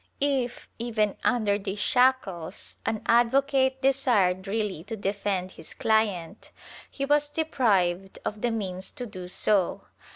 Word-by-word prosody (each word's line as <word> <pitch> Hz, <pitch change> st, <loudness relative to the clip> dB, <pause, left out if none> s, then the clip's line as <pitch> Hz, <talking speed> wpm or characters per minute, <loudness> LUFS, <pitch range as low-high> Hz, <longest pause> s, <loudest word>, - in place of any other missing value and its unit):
If, 270 Hz, -4 st, -1 dB
even 215 Hz, -4 st, 0 dB
under 215 Hz, -5 st, +2 dB
these 195 Hz, 0 st, -4 dB
shackles, 205 Hz, -7 st, +1 dB
an 220 Hz, -, -1 dB
advocate 265 Hz, +2 st, +3 dB
desired 215 Hz, -9 st, +2 dB
really 205 Hz, -5 st, -2 dB
to 225 Hz, +1 st, -5 dB
defend 195 Hz, -2 st, -2 dB
his 160 Hz, -, -10 dB
client, 210 Hz, -5 st, 0 dB, 0.4 s
he 275 Hz, -, -3 dB
was 295 Hz, +1 st, +2 dB
deprived 200 Hz, -, +1 dB
of 210 Hz, 0 st, -3 dB
the 240 Hz, -, +1 dB
means 190 Hz, -5 st, -4 dB
to 250 Hz, -4 st, -6 dB
do 185 Hz, -5 st, -8 dB
so. 190 Hz, 0 st, +1 dB
215 Hz, 130 wpm, -27 LUFS, 190-255 Hz, 0.4 s, advocate